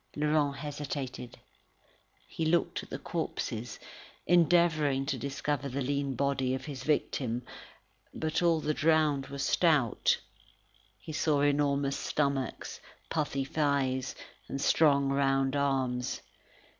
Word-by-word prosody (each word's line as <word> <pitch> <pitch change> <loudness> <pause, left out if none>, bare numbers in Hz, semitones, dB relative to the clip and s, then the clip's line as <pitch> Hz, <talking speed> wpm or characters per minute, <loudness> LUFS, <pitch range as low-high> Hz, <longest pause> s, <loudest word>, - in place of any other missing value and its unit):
Laurent 150 -1 +1
hesitated; 140 -4 -5 0.9
he 165 - -4
looked 165 +2 +1
at - - -13
the - - -4
corpses, 115 +3 -4 0.5
endeavouring 165 -5 +3
to 140 0 -1
discover 140 +2 -2
the 135 +2 -3
lean 140 0 -1
body 135 -2 0
of 130 - -6
his 140 -4 -6
victim. 125 -5 0 0.7
But 160 +1 -2
all 165 -2 +3
the 155 - 0
drowned 155 -3 +2
were 140 - -7
stout. 140 -4 +2 0.8
He 155 - -9
saw 150 -2 +2
enormous 140 -1 +2
stomachs, 140 -3 -2 0.3
puffy 145 -4 -1
thighs, 135 -3 0 0.3
and 135 - -4
strong 140 -1 +4
round 135 0 +2
arms. 130 -3 0
140 Hz, 115 wpm, -30 LUFS, 135-150 Hz, 0.9 s, strong